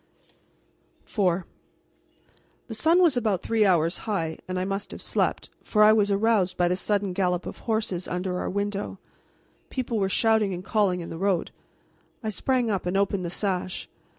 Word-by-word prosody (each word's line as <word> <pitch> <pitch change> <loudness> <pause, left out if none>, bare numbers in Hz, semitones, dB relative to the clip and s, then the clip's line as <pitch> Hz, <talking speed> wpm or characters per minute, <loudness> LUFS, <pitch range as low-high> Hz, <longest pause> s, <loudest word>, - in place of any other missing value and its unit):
IV 185 -4 +1 1.2
The 225 - -7
sun 325 +11 +4
was 325 -6 +4
about 215 -7 0
three 220 -2 +2
hours 170 -2 +2
high. 165 -6 -1
I 185 0 -1
must 195 +1 -3
have - - -8
slept, - - -1
for 210 -1 +3
I 215 +1 +8
was 205 -2 +3
aroused 200 -2 +2
by 175 - +3
the 180 - +1
sudden 200 0 0
gallop 180 -1 0
of - - -7
horses 215 -5 -1
under 180 +1 -2
our - - -2
window. 200 +1 -3 0.7
People 240 -4 -2
were 195 -1 +1
shouting 220 -2 +2
and 180 - -7
calling 195 -4 +1
in 165 - -7
the 165 - -6
road. 195 -3 0 0.7
I 220 - -1
sprang 245 +2 0
up 190 -3 -2
and 180 +2 0
opened 200 -1 +1
the 170 - -3
sash. 185 -1 -2
195 Hz, 170 wpm, -26 LUFS, 180-215 Hz, 1.2 s, I